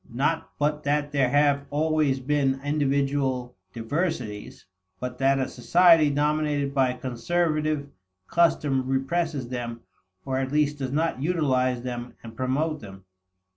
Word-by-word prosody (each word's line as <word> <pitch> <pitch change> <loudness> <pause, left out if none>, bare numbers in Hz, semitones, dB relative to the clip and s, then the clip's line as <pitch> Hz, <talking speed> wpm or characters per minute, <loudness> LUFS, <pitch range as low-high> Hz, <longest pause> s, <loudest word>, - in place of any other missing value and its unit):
Not 150 +7 -1
but 150 +1 0
that 145 0 0
there 135 -3 +2
have 145 0 +2
always 150 -2 +1
been 135 0 0
individual 140 -4 0 0.2
diversities, 115 - -4 0.3
but 125 0 -5
that 135 0 +3
a 130 - 0
society 165 +4 +5
dominated 145 -1 0
by 130 -2 +2
conservative 150 +4 -1 0.4
custom 145 - +2
represses 135 0 -1
them 120 -2 -5 0.4
or 130 -1 -1
at 130 0 -2
least 150 -1 +1
does 130 -2 -3
not 155 -2 0
utilize 130 -7 +1
them 120 -1 -5
and 115 -1 -10
promote 145 +5 -1
them. 95 -4 -12
140 Hz, 130 wpm, -25 LUFS, 130-150 Hz, 0.4 s, society